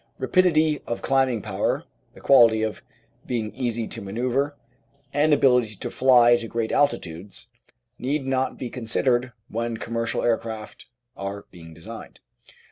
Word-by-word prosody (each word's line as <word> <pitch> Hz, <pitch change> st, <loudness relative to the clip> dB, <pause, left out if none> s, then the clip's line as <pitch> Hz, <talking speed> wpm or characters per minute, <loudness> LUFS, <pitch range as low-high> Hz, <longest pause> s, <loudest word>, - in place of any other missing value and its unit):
Rapidity 160 Hz, -5 st, +2 dB
of 120 Hz, -, -4 dB
climbing 130 Hz, -5 st, +1 dB
power, -, -, -1 dB, 0.3 s
the -, -, -14 dB
quality 115 Hz, -5 st, +5 dB
of 110 Hz, -1 st, -3 dB, 0.5 s
being 110 Hz, -4 st, -2 dB
easy 120 Hz, -2 st, -2 dB
to 115 Hz, -, -6 dB
manoeuvre, 125 Hz, +8 st, -1 dB, 0.6 s
and 150 Hz, +2 st, +3 dB
ability 125 Hz, -6 st, +3 dB
to 120 Hz, +4 st, -6 dB
fly 120 Hz, -2 st, +5 dB
to 115 Hz, -1 st, -6 dB
great 115 Hz, 0 st, -2 dB
altitudes 100 Hz, -, -1 dB, 0.5 s
need 135 Hz, +2 st, -1 dB
not 130 Hz, 0 st, -1 dB
be 125 Hz, -, -6 dB
considered 125 Hz, +1 st, 0 dB, 0.2 s
when 115 Hz, +1 st, -3 dB
commercial 115 Hz, 0 st, -2 dB
aircraft 110 Hz, -2 st, -3 dB, 0.3 s
are 100 Hz, +1 st, -6 dB
being 80 Hz, -2 st, -13 dB
designed. 110 Hz, +8 st, -10 dB
120 Hz, 130 wpm, -24 LUFS, 110-130 Hz, 0.6 s, quality